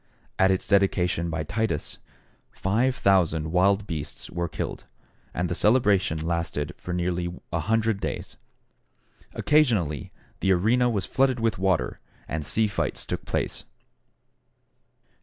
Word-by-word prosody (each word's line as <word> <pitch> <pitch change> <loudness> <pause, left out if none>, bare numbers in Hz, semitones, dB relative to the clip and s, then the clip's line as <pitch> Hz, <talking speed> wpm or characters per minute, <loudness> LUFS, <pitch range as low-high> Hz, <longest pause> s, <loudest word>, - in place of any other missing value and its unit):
At 95 - +5
its 95 -1 0
dedication 90 -4 +2
by 80 -1 -2
Titus, 100 0 -2 0.5
5,000 95 -8 +2
wild 100 +3 +3
beasts 80 -7 -5
were 85 0 -2
killed, - - -5 0.5
and 90 +1 -1
the 85 - -2
celebration 105 -5 +3
lasted 80 -2 -2
for 90 - -7
nearly 90 0 -1 0.2
a 80 - +1
hundred 110 +2 +1
days. - - -4 1.0
Occasionally 110 - +2 0.3
the 95 - +3
arena 120 +7 +3
was 105 -5 -1
flooded 130 -2 +2
with 115 -4 0
water, 95 -10 0 0.3
and 80 0 -3
sea 110 +9 +1
fights 85 -9 -2
took - - -4
place. - - -2
95 Hz, 120 wpm, -26 LUFS, 85-110 Hz, 1.0 s, At